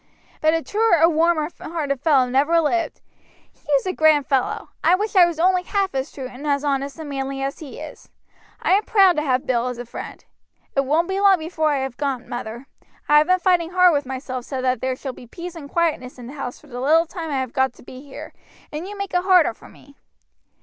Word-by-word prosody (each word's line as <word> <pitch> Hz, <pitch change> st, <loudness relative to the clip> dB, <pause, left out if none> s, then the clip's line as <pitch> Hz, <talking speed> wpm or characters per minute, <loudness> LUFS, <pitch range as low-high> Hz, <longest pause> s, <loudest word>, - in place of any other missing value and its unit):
But 315 Hz, +1 st, +3 dB
a 325 Hz, -, -1 dB
truer 435 Hz, -3 st, +2 dB
or 330 Hz, +2 st, +6 dB
warmer 325 Hz, -1 st, +2 dB
hearted 290 Hz, -5 st, -3 dB
fellow 280 Hz, -5 st, +4 dB
never 285 Hz, +7 st, +3 dB
lived. 330 Hz, +2 st, -1 dB, 0.5 s
He -, -, -10 dB
is 275 Hz, -, +3 dB
a 370 Hz, -, -1 dB
grand 310 Hz, -4 st, +4 dB
fellow. 265 Hz, -3 st, -1 dB
I 335 Hz, +3 st, +5 dB
wish 420 Hz, +2 st, -3 dB
I 360 Hz, -2 st, +7 dB
was 335 Hz, -2 st, -5 dB
only 365 Hz, +1 st, +3 dB
half 390 Hz, 0 st, -1 dB
as 270 Hz, +1 st, -3 dB
true 265 Hz, -2 st, -7 dB
and 260 Hz, +4 st, -8 dB
as 285 Hz, 0 st, +1 dB
honest 280 Hz, 0 st, -1 dB
and 320 Hz, -2 st, -7 dB
manly 270 Hz, -1 st, -4 dB
as 275 Hz, 0 st, -3 dB
he 300 Hz, -5 st, -9 dB
is. -, -, -10 dB, 0.5 s
I -, -, 0 dB
am 400 Hz, +3 st, +4 dB
proud 390 Hz, -5 st, +5 dB
to -, -, +2 dB
have 260 Hz, -3 st, 0 dB
Bill 245 Hz, -1 st, 0 dB
as 250 Hz, -1 st, -4 dB
a 245 Hz, -, -6 dB
friend. 235 Hz, -, -9 dB, 0.5 s
It 275 Hz, 0 st, +2 dB
won't 315 Hz, +5 st, +1 dB
be 380 Hz, +1 st, -2 dB
long 395 Hz, -1 st, +5 dB
before 315 Hz, -1 st, -1 dB
I 285 Hz, -2 st, 0 dB
have 265 Hz, -2 st, -6 dB
gone, 275 Hz, -4 st, -3 dB
mother. 240 Hz, +1 st, -6 dB, 0.4 s
I 295 Hz, 0 st, +6 dB
have 305 Hz, -, +2 dB
been 365 Hz, 0 st, +4 dB
fighting 355 Hz, -2 st, +2 dB
hard 365 Hz, -1 st, +5 dB
with 285 Hz, -2 st, -1 dB
myself 260 Hz, -1 st, -5 dB
so 265 Hz, -, -4 dB
that 255 Hz, 0 st, 0 dB
there 260 Hz, 0 st, -1 dB
shall 265 Hz, 0 st, -6 dB
be 245 Hz, -, -13 dB
peace 345 Hz, +7 st, -8 dB
and 305 Hz, -5 st, -10 dB
quietness 305 Hz, -7 st, -1 dB
in 245 Hz, -, -10 dB
the 255 Hz, -, -9 dB
house 275 Hz, -4 st, -6 dB
for -, -, -20 dB
the 250 Hz, -3 st, -7 dB
little 320 Hz, +5 st, +4 dB
time 330 Hz, -1 st, -6 dB
I 275 Hz, -3 st, -1 dB
have 255 Hz, -2 st, -4 dB
got 265 Hz, -1 st, +1 dB
to -, -, -18 dB
be 255 Hz, +1 st, -11 dB
here, 280 Hz, -1 st, -10 dB, 0.4 s
and 310 Hz, +5 st, -5 dB
you 410 Hz, 0 st, -8 dB
make 395 Hz, -1 st, -5 dB
it 360 Hz, -, +2 dB
harder 360 Hz, -8 st, +4 dB
for -, -, -16 dB
me." 280 Hz, 0 st, -19 dB
295 Hz, 240 wpm, -22 LUFS, 265-340 Hz, 0.5 s, I